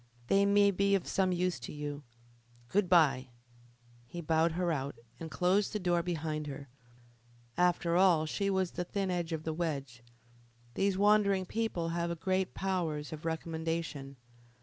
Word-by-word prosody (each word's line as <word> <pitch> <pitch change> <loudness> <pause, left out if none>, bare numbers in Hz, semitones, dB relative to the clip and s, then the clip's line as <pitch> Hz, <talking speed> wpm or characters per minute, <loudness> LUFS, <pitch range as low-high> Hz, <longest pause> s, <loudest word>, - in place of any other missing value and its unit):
They 200 0 +4
may 200 0 +5
be 200 +1 +2
of 195 - -1
some 190 -1 +1
use 180 -4 0
to - - -7
you. 145 -1 -5 0.7
Good 195 -2 +1
bye!" 135 -7 +4 0.8
He 175 - -7
bowed 160 0 +2
her 175 0 0
out, 140 -2 -3 0.2
and 165 - -6
closed 185 +5 +1
the 210 - -1
door 175 -2 +1
behind 160 -3 -3
her. 140 -1 -7 0.9
After 175 -1 +2
all 175 -4 +4
she 200 +5 -1
was 190 -2 0
the 180 - -3
thin 195 +1 -2
edge 175 -2 -2
of 160 -1 -3
the 160 - -2
wedge. 140 -7 -3 0.7
These 195 +7 +1
wandering 200 -2 +3
people 190 -5 -2
have 170 0 -2
great 190 +1 -1
powers 165 -6 -2
of 155 +1 -8
recommendation. 160 -3 -3
170 Hz, 155 wpm, -32 LUFS, 155-190 Hz, 0.9 s, may